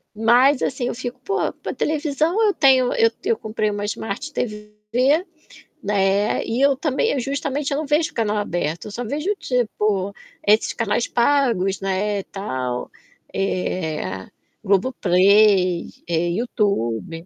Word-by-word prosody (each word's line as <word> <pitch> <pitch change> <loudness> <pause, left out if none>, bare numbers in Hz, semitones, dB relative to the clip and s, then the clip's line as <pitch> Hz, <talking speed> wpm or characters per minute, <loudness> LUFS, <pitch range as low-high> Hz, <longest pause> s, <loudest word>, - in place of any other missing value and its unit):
Mas 245 +5 +4
assim 255 -2 -1
eu - - -3
fico: 250 0 -6
"Pô, 400 +5 -1
para - - -4
televisão 310 +6 0
eu 405 - +2
tenho" 260 -3 +4
eu 230 0 +4
eu 460 +1 +2
comprei 215 -1 -2
uma 205 0 -4
smart 220 +8 -4
TV, 210 -4 -4 1.1
né, 200 0 +1
e 235 +4 -1
eu 280 -1 +4
também 280 -3 0
eu 275 - -1
justamente, 280 +2 -2
eu - - 0
não 310 - -2
vejo 305 +2 +1
canal 215 -2 0
aberto, 170 -5 -2
eu - - -8
só 245 +4 -4
vejo, 300 - -1
tipo, 210 -5 -1 0.3
esses 215 +2 +4
canais 225 0 0
pagos, 235 -8 +1
né, 195 +1 -1
tal, 130 -11 -4 0.4
eh, 160 - -2 0.4
Globo 200 +6 +2
Play, 185 -1 +4 0.2
eh, 170 0 0
YouTube. 170 - -1
215 Hz, 140 wpm, -21 LUFS, 195-265 Hz, 1.1 s, Mas